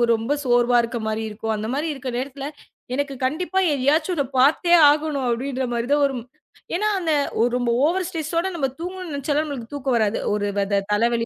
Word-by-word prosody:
ரொம்ப 225 +5 -1
சோர்வா 245 -1 +3
இருக்க 235 0 -3
மாதிரி 220 +1 -2
இருக்கும். 220 +1 -3
அந்த 215 +1 -4
மாதிரி 295 +4 -1
இருக்குற 260 -2 -6
நேரத்துல, 275 +1 -5 0.5
எனக்குக் 275 -1 -3
கண்டிப்பா 355 +7 -1
எதையாச்சும் 295 +6 +1
ஒன்ன 285 -4 0
பார்த்தே 310 +6 +4 0.2
ஆகணும் 295 -2 0
அப்படின்ற 260 +2 -1
மாதிரி 235 +1 -1
தான் 290 - +3
வரும். 260 -4 -2 0.5
ஏன்னா 425 +4 +1
அந்த 325 -3 0 0.4
ரொம்ப 245 -1 -1 0.2
ஓவர் 360 +3 0
ஸ்ட்ரெஸ் 320 -3 -5
ஓட 355 - -1
நம்ம 275 -5 0
தூங்கனும் 365 -1 -6
நெனச்சாலும் 290 +2 -1
நமக்குத் 245 -3 -7
தூக்கம் 265 -3 0
வராது. 215 -1 +1
ஒரு 205 -1 0 0.5
தலைவலி, 230 +2 +1
275 Hz, 175 wpm, -22 LUFS, 240-310 Hz, 0.5 s, பார்த்தே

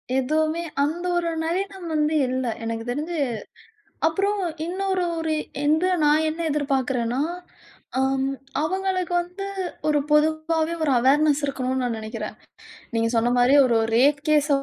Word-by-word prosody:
எதுவுமே, 310 +5 +1 0.2
அந்த 330 +5 -2
ஒரு 340 -1 0 0.2
நவீனம் 375 +1 -3
வந்து 305 0 +1
இல்ல 255 0 -1 0.2
எனக்கு 225 0 -3
தெரிஞ்சு. 305 +7 -3 0.9
அப்புறம் 395 +5 0 0.3
இன்னொரு 375 +1 -1 0.2
ஒரு 320 -1 -1 0.3
எந்த 310 +4 +3 0.2
நான் 300 +2 +4
என்ன 320 +2 -4
எதிர்பார்க்கிறேன்னா, 265 -4 0 0.8
அம் 265 0 +1 0.4
அவங்களுக்கு 370 +1 -1
வந்து 360 +3 -7 0.4
ஒரு 300 -1 +3
பொதுவாவே 315 +2 +2
ஒரு 295 - +2
அவேர்னஸ் 290 +3 +3
இருக்கணும்ன்னு 260 -2 -2
நான் 240 -2 -1
நெனைக்கிறேன். 220 0 -6 0.6
நீங்க 230 0 +2
சொன்ன 230 +1 +2
மாரி 245 +2 +4
ஒரு 235 -2 +2 0.2
ரேப் 280 +4 +4
கேஸ 300 -1 +3
300 Hz, 125 wpm, -24 LUFS, 260-335 Hz, 0.9 s, நான்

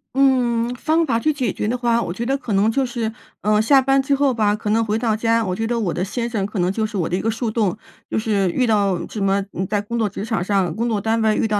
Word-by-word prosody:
嗯， 245 -3 +2
方 315 +5 +1
法 230 -6 +1
去 310 +6 +2
解 255 -8 -1
决 - - -3
的 245 +3 0
话， 235 -1 +1
我 175 - -3
觉 230 +6 -4
得 270 +2 +1
可 235 -6 -4
能 200 +3 +3
就 270 +3 +1
是， 235 -3 -3 0.3
呃， 210 0 +3
下 270 +5 +5
班 270 +1 +3
之 275 +1 +1
后 275 -1 +2
吧， 210 -3 +2
可 210 0 -4
能 225 +1 +3
回 215 0 0
到 225 -2 0
家 230 +1 +1
我 185 -1 -2
觉 225 +3 -2
得 235 0 -1
我 190 -7 -1
的 180 - -2
先 230 +5 -3
生 215 -5 -1
可 205 +1 -6
能 180 +1 +2
就 220 +2 -1
是 210 -1 -6
我 175 - 0
的 175 - 0
一 190 - -1
个 225 - 0
树 225 0 -2
洞。 210 -5 0 0.3
就 - - -2
是 210 -4 +1
遇 255 - +1
到 200 -6 +1
什 215 - -6
么， 195 0 +1
嗯， 190 - -3
在 205 +1 0
工 235 +3 -4
作 220 - +2
职 195 - -6
场 225 -5 -1
上、 190 -3 0
工 235 +2 -1
作 215 -3 0
单 225 +2 0
位 220 -1 +3
遇 - - +1
到 210 -1 0
225 Hz, 320 characters per minute, -21 LUFS, 205-240 Hz, 0.3 s, 下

